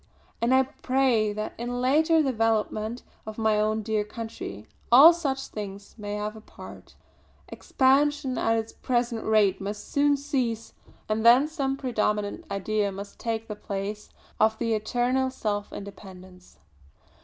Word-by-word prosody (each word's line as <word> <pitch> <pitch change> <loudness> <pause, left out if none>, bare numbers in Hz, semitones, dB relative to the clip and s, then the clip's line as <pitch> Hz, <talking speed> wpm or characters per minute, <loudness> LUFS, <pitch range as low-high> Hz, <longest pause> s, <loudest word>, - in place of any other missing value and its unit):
and 235 +2 +2
I 260 0 +5
pray 255 -5 +1
that 215 +1 -4
in 240 +1 -3
the 245 - -3
later 310 +6 +3
development 225 -2 -1 0.2
of 215 - -7
my 220 -1 +2
own 215 +1 0
dear 215 -1 0
country, 210 - -7 0.3
all 285 +8 +10
such 275 -6 -2
things 200 -1 -8
may 205 -2 -5
have 210 +1 -4
a 220 - -11
part. - - -13 0.5
Expansion 275 0 +1
at 225 - +1
its 225 0 -4
present 240 -2 -1
rate 215 -3 +2
must 205 +1 -5
soon 285 0 +3
cease; 255 -6 -2 0.3
and 220 +1 -1
then 245 +5 +6
some 275 -4 -2
predominant 215 +2 -1
idea 205 +1 -1
must 200 +1 -9
take 225 -1 -3
the 210 - -5
place 205 +1 -5 0.3
of 220 0 +3
the 230 -1 0
eternal 245 +4 0
self 205 -5 -3
independence. 185 -2 -11
225 Hz, 145 wpm, -26 LUFS, 210-260 Hz, 0.5 s, all